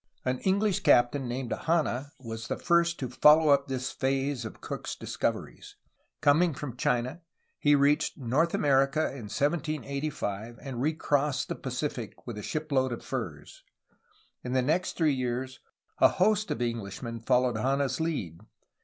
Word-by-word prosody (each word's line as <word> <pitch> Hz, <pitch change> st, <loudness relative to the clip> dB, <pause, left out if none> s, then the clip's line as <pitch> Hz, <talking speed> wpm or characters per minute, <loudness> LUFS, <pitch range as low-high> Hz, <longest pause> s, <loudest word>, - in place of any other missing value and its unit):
An 130 Hz, 0 st, 0 dB
English 195 Hz, 0 st, +1 dB
captain 120 Hz, +2 st, +3 dB
named 120 Hz, 0 st, -4 dB
Hanna 150 Hz, -3 st, -1 dB
was 115 Hz, -2 st, -6 dB
the -, -, -2 dB
first 170 Hz, -1 st, +2 dB
to 130 Hz, -, -3 dB
follow 150 Hz, +5 st, +6 dB
up 140 Hz, 0 st, +4 dB
this 130 Hz, -1 st, -3 dB
phase 135 Hz, -1 st, -1 dB
of 110 Hz, -, -8 dB
Cook's -, -, -5 dB
discoveries. -, -, -4 dB, 0.5 s
Coming 155 Hz, +2 st, +4 dB
from 130 Hz, -3 st, -6 dB
China, 125 Hz, +5 st, -1 dB, 0.4 s
he 145 Hz, 0 st, +4 dB
reached 145 Hz, +1 st, +2 dB
North 145 Hz, +6 st, +1 dB
America 135 Hz, +1 st, +3 dB
in 120 Hz, -6 st, -8 dB
1785, 140 Hz, -7 st, -2 dB
and 130 Hz, -4 st, -5 dB
recrossed 145 Hz, -1 st, 0 dB
the -, -, -2 dB
Pacific 125 Hz, -3 st, -5 dB
with 115 Hz, -4 st, -6 dB
a -, -, -5 dB
shipload 140 Hz, -2 st, -1 dB
of 120 Hz, -, -6 dB
furs. -, -, -6 dB, 0.8 s
In 125 Hz, -, -4 dB
the 130 Hz, -1 st, +2 dB
next 160 Hz, +7 st, 0 dB
three 155 Hz, -4 st, +2 dB
years 130 Hz, 0 st, -3 dB, 0.4 s
a -, -, +8 dB
host 210 Hz, +2 st, +2 dB
of 120 Hz, -, -1 dB
Englishmen 115 Hz, 0 st, -4 dB
followed 125 Hz, 0 st, +2 dB
Hanna's 135 Hz, +2 st, 0 dB
lead. 125 Hz, -, -2 dB
135 Hz, 145 wpm, -28 LUFS, 125-150 Hz, 0.8 s, a